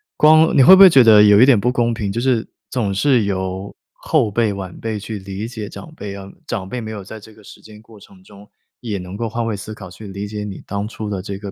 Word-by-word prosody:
光 155 +1 +5
你 135 - +6
会 185 - +9
不 - - +3
会 195 -1 +10
觉 135 -6 +6
得 110 -2 +7
有 105 0 +6
一 - - +8
点 130 -5 +4
不 120 - 0
公 120 -1 0
平， 110 -3 -4
就 115 +4 -3
是 125 -3 0 0.2
总 110 -6 -2
是 125 +3 +2
由 95 0 -4 0.2
后 110 - -1
辈 110 0 0
晚 95 -2 -8
辈 110 -1 -4
去 105 +1 -7
理 95 +2 -7
解 110 -3 -7
长 160 +9 -11
辈 100 -1 -7
啊， 100 0 -10 0.2
长 95 -5 -5
辈 125 - -5
没 110 -2 -7
有 105 -2 -7
在 110 +3 -10
这 110 +1 -16
个 105 - -20
时 - - -14
间 105 -1 -15
过 110 -1 -18
程 95 -1 -19
中， 100 +1 -17 0.3
也 110 -5 -5
能 90 +1 -8
够 115 +1 -3
换 115 +1 -3
位 110 -2 -3
思 110 +2 -8
考 95 -5 -11
去 105 +3 -11
理 100 +1 -6
解 105 0 -6
你 100 -2 -9
当 100 +1 -4
初 110 -1 -7
的 100 -2 -4
这 100 0 -7
个 100 -1 -8
105 Hz, 290 characters per minute, -18 LUFS, 100-115 Hz, 0.3 s, 会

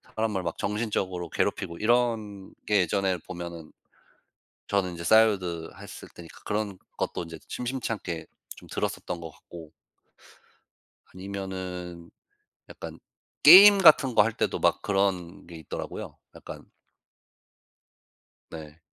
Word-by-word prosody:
사람을 110 -4 -1
막 85 -1 -4
정신적으로 100 -5 -3
괴롭히고 85 +1 -2
이런 110 -4 0
게 105 -1 +3
예전에는 95 0 0
보면은 85 -3 -8 1.0
저는 95 -3 0
이제 85 - -8
싸이월드 95 -5 +2
했을 - - -10
테니까 85 -1 -13
그런 105 -2 -3 0.2
것도 - - -3
인제 80 0 -10
심심찮게 115 -9 -4 0.3
좀 - - -15
들었었던 85 -1 -4
것 80 - -8
같고. 80 +1 -13 1.4
아니면은 95 -3 -7 0.6
약간 - - -9 0.4
게임 200 +2 +10
같은 150 -9 +6
거 105 - +7
할 115 0 -1
때도 - - -2
막 - - +2
그런 95 -4 -1
게 85 - -11
있더라고요 80 - -7 0.2
약간. - - -11 1.8
네. 80 -1 -10
95 Hz, 255 characters per minute, -26 LUFS, 85-105 Hz, 1.8 s, 게임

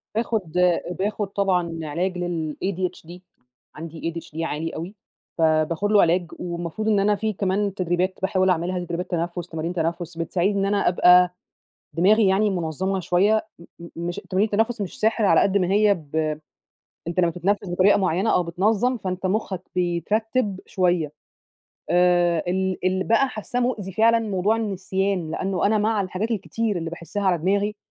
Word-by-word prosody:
باخُد 220 -6 -1 0.5
باخُد 205 +1 -1
طبعًا 180 -4 0
علاج 180 +5 -2
للADHD، 175 +1 -3 0.6
عندي 165 +1 -5
ADHD 165 -1 -7
عالي 165 0 -3
أوي، 175 +6 -6 0.4
فباخُد 160 +4 +1
له 210 - +6
علاج. 175 +2 +2
والمفروض 175 +4 -4
إن 210 -2 +3
أنا 205 +1 +3
في 215 +2 -2
كمان 195 +1 -1
تدريبات 185 0 0
باحاول 190 0 +2
أعملها 180 +1 0
تدريبات 175 +1 -4
تنفس، 175 0 -2
تمارين 165 +1 -3
تنفس 170 0 -3
بتساعِدني 185 +4 0
إن 195 - +1
أنا 200 0 +1
أبقى 180 0 +5 0.6
دماغي 205 +5 +4
يعني 200 +2 +3
مُنظَّمة 190 +2 -2
شوية 200 +6 +2
م 170 - -14 0.2
م 170 - -10 0.2
مش 175 - -4
تمارين 190 +3 +2
التنفس 225 +2 +1
مش 195 -4 -5
سِحر 220 0 +2
على 195 - +5
قد 200 0 +3
ما 185 - +1
هي 205 0 +4
ب 155 -4 -9 0.9
أنت 175 +2 0
لمّا 170 -1 +2
تتنفس 190 +4 -1
بطريقة 185 +3 +4
معيّنة 190 +2 +1
أو 180 - +3
بتنَظّم، 210 +8 +1
فأنت 185 -2 -3
مُخّك 190 -2 -2
بيترتِّب 195 +4 0
شوية. 175 -5 0 0.8
آآ، 175 -1 +3
ال 190 +1 0
اللي 185 0 +1
بقى 230 +4 +3
حاسّاه 245 +1 -4
مؤذي 220 -6 -2
فعلًا، 230 +3 +4
موضوع 210 0 0
النسيان، 195 -4 -2
لأنّه 190 +3 -1
أنا 215 +1 +2
مع 215 0 +1
الحاجات 195 +3 -3
الكتير 225 0 -2
اللي 165 -1 -4
باحِسّها 170 +4 -5
على 185 -3 +2
دماغي، 200 +5 0
185 Hz, 155 wpm, -23 LUFS, 175-205 Hz, 0.9 s, له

